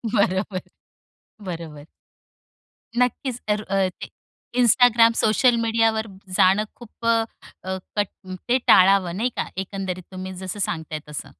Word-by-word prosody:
बरोबर, 190 -1 +1 0.9
बरोबर. 160 -4 -7 1.1
नक्कीच 250 0 0
तर 210 0 +1
अ, 195 -1 +1
ते - - -6 0.5
Instagram, 235 -1 +5
सोशल 235 +3 +3
मीडियावर 225 -1 +1 0.3
जाणं 195 +3 +5
खूप 235 0 -12
अ, 230 - +5 0.5
अ, 190 0 -3 0.2
कट 205 -2 +2 0.4
ते 255 - +5
टाळावं 185 -2 +5
नाही 245 +3 +1
का? - - -1 0.2
एकंदरीत 185 -2 -5
तुम्ही 185 0 -6
जसं 190 +2 -5
सांगताय 160 -1 -4
तसं. 150 - -6
200 Hz, 120 wpm, -23 LUFS, 185-230 Hz, 1.1 s, Instagram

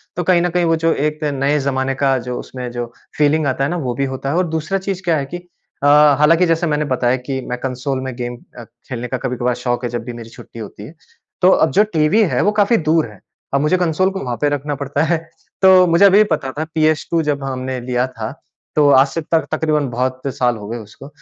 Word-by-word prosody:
तो 180 - -1
कहीं 175 0 +3
न 175 - +1
कहीं, 175 0 +1
वो 165 0 +3
जो 165 0 +1
एक 150 +1 -2
नए 145 0 +1
ज़माने 135 -1 -1
का 135 -1 +2
जो 125 - -3
उसमें 125 -1 -7
जो 120 0 -3 0.3
फ़ीलिंग 150 +1 +2
आता 135 +1 0
है 140 - 0
ना, 175 - -2
वो 125 -6 -2
भी 140 - 0
होता 135 +1 -4
है, 155 - -1
और 180 -1 +1
दूसरा 160 +4 -2
चीज़ 190 -1 -4
क्या 165 -3 +2
है 140 - -2
कि 175 +6 -6
अ, 175 -4 -7 0.3
हालाँकि 165 +4 +5
जैसे 165 0 +1
मैंने 150 0 0
बताया 130 -2 +1
कि 135 -1 -1
मैं 125 - -2
कंसोल 130 +1 -2
में 130 -2 -5
गेम 120 -1 -5 0.2
अ, - - -8 0.3
खेलने 125 -1 -4
का 130 - -3
कभी-कभार 125 0 -2
शौक़ 120 0 -1
है - - -2
जब 120 -1 -4
भी 120 - -6
मेरी 115 -1 -9
छुट्टी 115 - -13
होती 105 -1 -9
है। 160 - -13 0.5
तो 185 - +6
अब 160 - +3
जो 205 +3 +4
टीवी 160 +8 +3
है, 180 - +1
वो 210 - +3
काफ़ी 210 +2 +3
दूर 160 -6 +3
है। 100 - -16 0.3
अब 140 - +2
मुझे 155 +5 +2
कंसोल 180 +2 +1
को 190 - -5
वहाँ 125 -2 -3
पे 145 - +3
रखना 145 0 -2
पड़ता 140 +2 -1
है। 165 +1 +1 0.4
तो 185 -1 +7
मुझे 170 +4 +5
अभी 195 +1 +6
भी 215 - +7
पता 135 -4 -1
था - - 0
पीएस2 155 +1 +1
जब 145 -2 -1
हमने 130 -1 -3
लिया 125 0 0
था, 115 -4 -6 0.4
तो 150 -1 +4
आज 135 0 +6
से 165 +4 -4
तक 160 +1 0
तक़रीबन 150 -3 0
बहुत 130 +2 -2
साल 120 -2 +1
हो 105 -1 -9
गए 120 +2 -4
उसको। 110 +5 -12
145 Hz, 250 wpm, -18 LUFS, 130-165 Hz, 0.5 s, तो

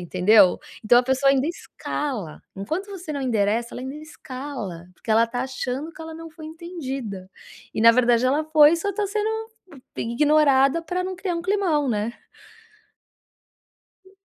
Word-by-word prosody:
Entendeu? 185 +2 +4 0.2
Então, 240 +2 +5
a - - +4
pessoa 265 +2 +1
ainda 275 0 +2
escala, 270 - -5 0.2
enquanto 315 - -3
você 360 -5 -7
não 280 - -3
endereça, 230 -2 0
ela - - -6
ainda 265 +2 -6
escala, 260 - -8
porque 225 - -8
ela 225 +1 +4
tá 245 +2 -3
achando 260 +4 -4
que 320 - -14
ela 320 0 -7
não 330 0 -9
foi 315 0 -11
entendida. 270 - -6 0.4
E - - -1
na 230 0 +8
verdade 240 0 +3
ela 285 +4 +2
foi, 310 +1 +6
só 400 +5 -2
tá 415 0 -1
sendo, 420 +2 -1 0.7
eh, - - -3
ignorada 280 +3 +3
pra 360 +3 -3
não 375 0 -4
criar 365 -1 -3
um 335 - -4
climão, 360 -6 +1
né? 220 0 -1 1.9
Tá. 380 - -21
275 Hz, 165 wpm, -23 LUFS, 235-325 Hz, 1.9 s, na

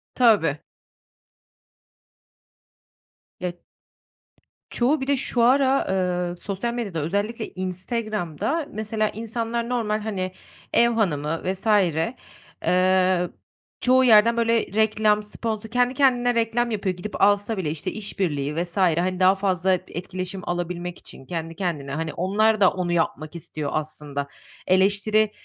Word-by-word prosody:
Tabii. 210 - +4 2.8
Ya 180 -1 -3 1.2
çoğu 265 +5 +1
bir 265 - -3
de 280 - +3
şu 245 -2 -1
ara, 265 +2 +4
ııı, 180 -2 -1
sosyal 200 +6 -3
medyada 210 -9 -3
özellikle 205 +8 -2
Instagram'da 210 - -2
mesela 215 0 -1
insanlar 230 +1 -3
normal, 220 -4 0
hani, 190 -4 -3 0.4
ev 235 - +5
hanımı 165 -9 0
vs. 190 +3 -3 1.0
ııı, 185 -1 +3 0.5
çoğu 255 +1 +5
yerden, 230 -1 +6
böyle, 230 0 +3
reklam, 215 0 +1
sponsor 220 +1 -4
kendi 245 +2 +2
kendine 245 -3 +3
reklam 230 +1 +1
yapıyor, 195 -3 -1
gidip 195 +3 -6
alsa 205 +2 +3
bile, 175 -5 -1
işte, 150 -1 -4
işbirliği 160 -9 -2
vs. 175 +2 -7
hani, 180 0 +2
daha 185 +1 +5
fazla 190 -1 +1
etkileşim 185 +1 -5
alabilmek 175 0 -3
için 135 - -12
kendi 165 +1 -5
kendine. 155 -8 -3
Hani, 160 +2 -3
onlar 210 +4 +2
da 190 - +6
onu 180 -2 -2
yapmak 165 -1 -1
istiyor 155 -3 -5
aslında. 150 -2 -4 0.4
Eleştiri 200 +3 +3
195 Hz, 120 wpm, -24 LUFS, 175-225 Hz, 2.8 s, yerden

